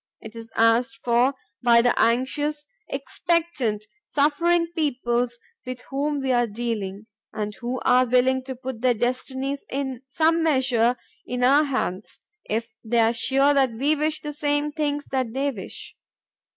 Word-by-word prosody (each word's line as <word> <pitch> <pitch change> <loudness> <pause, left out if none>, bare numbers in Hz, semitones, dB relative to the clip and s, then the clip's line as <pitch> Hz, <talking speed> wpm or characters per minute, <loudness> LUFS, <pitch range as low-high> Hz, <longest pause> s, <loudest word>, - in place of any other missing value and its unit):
It 220 0 -11
is 230 0 -9
asked 230 +1 +3
for 245 +3 +3 0.3
by 235 -1 +5
the 245 - +4
anxious, 290 +6 +1 0.2
expectant, 320 -12 -1 0.2
suffering 335 +4 +2
peoples 245 -6 0 0.3
with 255 -1 -6
whom 285 +1 -1
we 265 -1 0
are 240 -1 +3
dealing 210 -3 -4 0.3
and 210 -1 -3
who 245 +4 -4
are 250 0 +4
willing 255 +2 +3
to 260 -1 -5
put 255 -2 -7
their 250 -1 +3
destinies 260 +4 -2
in 265 -2 -3
some 325 +3 +2
measure 255 -6 +2 0.3
in 250 0 -2
our 280 +4 +5
hands, 220 -8 -3 0.3
if 225 +1 -2
they 235 +1 0
are 225 0 +4
sure 275 +4 +3
that 265 -4 +2
we 280 +7 +1
wish 305 +1 -1
the 295 0 -5
same 290 0 0
things 290 -1 -2
that 260 -4 -1
they 280 +1 +1
wish. 205 -7 -8
255 Hz, 150 wpm, -24 LUFS, 235-290 Hz, 0.3 s, by